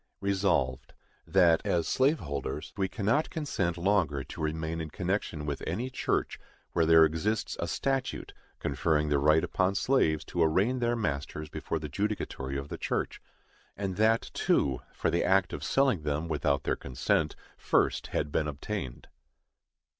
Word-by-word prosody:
Resolved, 95 -10 0 0.3
That, 85 -4 +5
as 85 -2 0
slave 140 +5 +2
holders, 70 -2 -4
we 95 -2 0
cannot 115 +10 0
consent 100 - -2
longer 85 -7 +1
to - - -9
remain 80 +1 -2
in 80 - -5
connection 90 -3 -2
with 75 -1 -3
any 115 +11 -2
church - - -1 0.3
where 80 -1 +2
there 80 -1 +8
exists 100 +8 -1
a 85 - -1
statute 130 - -2 0.2
conferring 75 +2 0
the 70 -1 +3
right 75 +3 +4
upon 95 +1 +1
slaves 80 - +2
to 85 - -2
arraign 95 +11 +2
their 120 0 +1
masters 75 - -3
before 80 - -3
the 75 -1 -5
judicatory 70 -7 -3
of 70 +1 -5
the - - -6
church—and 95 -2 -5
that, 110 +1 +2
too, 65 -2 +1
for - - -1
the 85 - +1
act 95 -1 +3
of - - -5
selling 135 - +2
them 75 +2 -2
without 70 -3 0
their - - 0
consent 65 -2 0 0.2
first - - +1
had 75 - -2
been 75 - 0
obtained. 75 - -5
85 Hz, 155 wpm, -29 LUFS, 75-100 Hz, 0.3 s, there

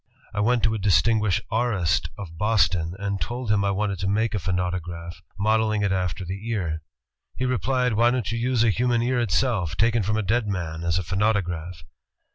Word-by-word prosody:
"I 105 - -2
went 120 +3 +2
to 110 - +2
a 110 - -2
distinguished 105 +1 +3
aurist 110 -7 +1
of 85 -5 -8
Boston, 95 -4 +1
and 100 0 -3
told 120 -1 -2
him 100 -1 +3
I 100 - +1
wanted 100 -1 -1
to 95 - -1
make 110 +3 +1
a 105 - 0
phonautograph, 90 -1 -3 0.2
modeling 110 0 +2
it 100 - +1
after 90 -1 -1
the 100 +5 -5
ear. 85 -8 -2 0.5
He 130 - -2
replied, 125 0 +1
'Why 115 +3 +4
don't 120 -5 -1
you 115 - -2
use 120 -1 +2
a 115 - +4
human 120 +2 +1
ear 125 0 +1
itself, 95 - 0
taken 115 +2 +3
from 110 +2 0
a 110 - 0
dead 110 +3 +1
man, 85 -4 -3
as 85 0 +1
a 95 - -1
phonautograph? 90 -3 -1
105 Hz, 195 wpm, -24 LUFS, 90-115 Hz, 0.5 s, Why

